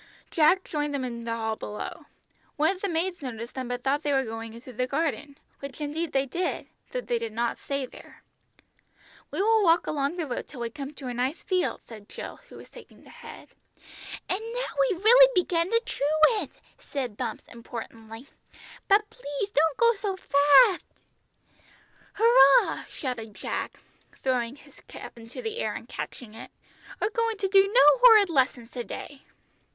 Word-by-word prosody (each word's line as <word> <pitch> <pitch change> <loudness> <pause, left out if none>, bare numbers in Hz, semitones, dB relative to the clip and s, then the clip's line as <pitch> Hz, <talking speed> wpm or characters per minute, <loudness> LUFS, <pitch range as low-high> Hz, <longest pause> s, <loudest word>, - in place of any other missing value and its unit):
Jack 345 +4 +4
joined 295 -2 -3
them 270 - -2
in 235 -2 -6
the 230 - -3
hall 220 -1 -2
below. 210 -1 -7 0.5
One 315 +6 +2
of 370 - -15
the 400 - -1
maids 345 +1 -2
noticed 235 -3 -6
them 260 -2 -5
but 245 0 -4
thought 280 +2 +1
they 290 -2 0
were 270 -1 +2
going 225 0 -7
into 250 +2 -11
the 250 +2 -1
garden, 285 -1 -2 0.2
which 275 0 -8
indeed 305 +3 -3
they 270 0 +1
did, 350 +7 -3 0.3
though - - -2
they 240 - -1
did 230 -2 -5
not 235 +1 -1
stay 275 -1 -3
there. - - -15 1.1
"We 390 - -1
will 440 0 +4
walk 335 -1 +4
along 290 +3 -1
the 335 - -2
road 250 - -5
till 255 - -10
we 235 -1 -3
come 275 +2 -7
to 275 - -9
a 245 - -3
nice 255 +5 -2
field," 370 -2 -1
said 215 -3 -12
Jill, - - -8
who - - -13
was - - -12
taking - - -16
the - - -16
head. - - -12 0.8
"And 370 - -1 0.2
now - - -1
we've 420 -7 +1
really - - +8
begun 345 -1 +1
to 460 - +3
truant!" 310 - +2 0.3
said 255 -7 -5
Bumps 235 -1 -4
importantly; 230 +1 -9 0.6
"but 415 +2 +4
please 395 - -5
don't 315 -2 +2
go 470 0 +5
so 395 -2 -4
fatht!" 295 - +5 1.3
"Hurrah!" 410 - +5
shouted 225 -6 -6
Jack, - - -4 0.5
throwing 250 -1 0
his - - -19
cap - - -10
into 230 - -9
the 445 +1 -4
air - - -2
and - - -8
catching 225 -4 -7
it; 225 - -10 0.5
"we're 415 - 0
going 460 -1 -1
to 395 - -1
do 390 +1 +4
no - - +6 0.2
horrid 440 -7 +7
lessons 255 -5 0
to 245 - -5
day!" 275 +3 -8
285 Hz, 180 wpm, -27 LUFS, 245-380 Hz, 1.3 s, really